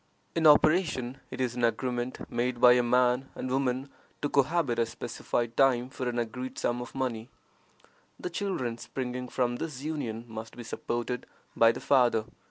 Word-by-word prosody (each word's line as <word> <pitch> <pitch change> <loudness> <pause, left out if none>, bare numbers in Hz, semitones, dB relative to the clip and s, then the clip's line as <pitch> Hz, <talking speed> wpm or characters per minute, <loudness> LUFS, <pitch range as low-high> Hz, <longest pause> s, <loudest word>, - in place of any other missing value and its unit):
In 165 -2 +4
operation, 150 -5 +4
it 130 - -7
is 125 -2 0
an 120 - -2
agreement 120 +1 -1
made 120 +1 -1
by 125 0 +8
a 125 - +4
man 125 +2 +2
and 130 - -4
woman 130 0 0 0.4
to 145 - +1
cohabit 140 -3 +2
a 115 - +3
specified 120 +1 -3
time 130 -2 +3
for 130 -2 -3
an 120 - -3
agreed 125 +2 -3
sum 120 0 -1
of 125 - -9
money. 120 -4 -2 0.9
The 180 - -4
children 150 - -2
springing 125 0 -4
from 120 -1 0
this 145 -4 -5
union 130 -8 -3
must 110 0 -8
be 120 - -6
supported 120 +1 -3 0.3
by 115 0 +6
the 115 - -7
father. 120 -5 +3
125 Hz, 170 wpm, -29 LUFS, 120-135 Hz, 0.9 s, by